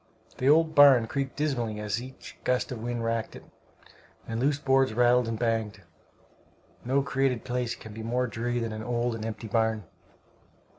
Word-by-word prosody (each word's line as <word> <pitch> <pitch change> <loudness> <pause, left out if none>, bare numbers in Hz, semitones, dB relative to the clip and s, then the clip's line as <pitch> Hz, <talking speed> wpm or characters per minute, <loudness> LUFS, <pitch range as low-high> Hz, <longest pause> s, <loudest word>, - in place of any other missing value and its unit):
The 130 - +2
old 160 +1 +4
barn 140 -5 +7
creaked 135 +3 -3
dismally 120 -8 -2
as 105 +2 -2
each 130 +1 -11
gust 125 +1 0
of 120 -3 -5
wind 120 0 -3
racked 115 -1 -2
it, - - -11 0.8
and 115 0 -3
loose 140 +3 +2
boards 135 -4 +2
rattled 120 0 +4
and 115 -1 -2
banged. 110 -4 -2 1.0
No 135 +3 +1
created 135 -3 0
place 120 -1 -2
can 110 -2 -11
be 110 - -7
more 120 +3 0
dreary 120 0 -3
than 115 -2 -2
an 110 - -5
old 120 +1 -1
and 115 -1 -5
empty 110 0 -5
barn. 110 -1 0
120 Hz, 175 wpm, -27 LUFS, 115-130 Hz, 1.0 s, barn